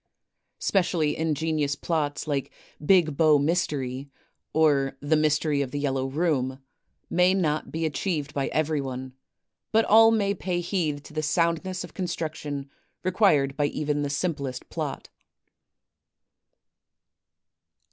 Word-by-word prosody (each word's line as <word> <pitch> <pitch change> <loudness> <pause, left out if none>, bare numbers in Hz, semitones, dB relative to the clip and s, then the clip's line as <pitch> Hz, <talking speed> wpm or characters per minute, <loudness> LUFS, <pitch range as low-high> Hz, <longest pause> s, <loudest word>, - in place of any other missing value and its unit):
Specially 170 -5 +1
ingenious 155 -2 0
plots, 150 -3 -2
like 140 -3 -2 0.3
"Big 165 -3 +4
Bow 155 -1 +5
Mystery" 140 -4 -1 0.4
or 145 -4 +2
"The 145 +2 +1
Mystery 150 -1 +2
of 135 - -2
the 145 - -5
Yellow 135 -2 -1
Room," 135 -3 0 0.5
may 180 +2 +3
not 155 -5 -1
be 160 0 -2
achieved 150 -1 -2
by 140 -1 -1
cverj'one; 135 -4 -2 0.6
but 225 +1 +4
all 225 +1 +7
may 205 -3 +2
pay 180 -3 -2
heed 165 -5 -2
to 150 - -13
the 155 - -1
soundness 170 +4 0
of 180 - -10
construc 170 -4 -3
tion 145 -3 -5 0.4
required 175 -8 +3
by 145 -1 +1
even 145 0 -1
the 145 - -1
simplest 140 -3 -3
plot. - - -5
155 Hz, 125 wpm, -26 LUFS, 140-170 Hz, 0.6 s, all